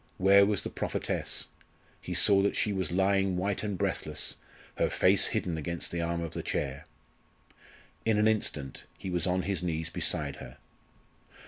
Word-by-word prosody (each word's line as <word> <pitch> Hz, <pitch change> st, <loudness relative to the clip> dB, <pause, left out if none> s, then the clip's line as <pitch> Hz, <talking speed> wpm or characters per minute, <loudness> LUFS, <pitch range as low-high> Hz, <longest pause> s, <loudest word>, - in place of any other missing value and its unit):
Where 100 Hz, +1 st, +6 dB
was 105 Hz, -2 st, 0 dB
the -, -, -4 dB
prophetess? -, -, -2 dB, 0.6 s
He 90 Hz, -, -5 dB
saw 95 Hz, +3 st, +6 dB
that 100 Hz, -, +1 dB
she 105 Hz, -, +1 dB
was 95 Hz, -2 st, -2 dB
lying 95 Hz, 0 st, +2 dB
white 100 Hz, +2 st, -1 dB
and 105 Hz, -3 st, -3 dB
breathless, -, -, -2 dB, 0.4 s
her -, -, +2 dB
face -, -, +4 dB
hidden 80 Hz, -3 st, -2 dB
against 85 Hz, +2 st, -4 dB
the 85 Hz, -, -2 dB
arm 85 Hz, 0 st, -1 dB
of 85 Hz, -, -5 dB
the -, -, -3 dB
chair. 70 Hz, -1 st, -3 dB, 1.2 s
In 110 Hz, -2 st, +2 dB
an 105 Hz, +1 st, +4 dB
instant 75 Hz, -11 st, -1 dB
he 95 Hz, -, -5 dB
was 90 Hz, 0 st, 0 dB
on 90 Hz, 0 st, +1 dB
his 95 Hz, -3 st, -1 dB
knees 80 Hz, -2 st, -2 dB
beside -, -, 0 dB
her. -, -, -10 dB
90 Hz, 165 wpm, -30 LUFS, 85-100 Hz, 1.2 s, Where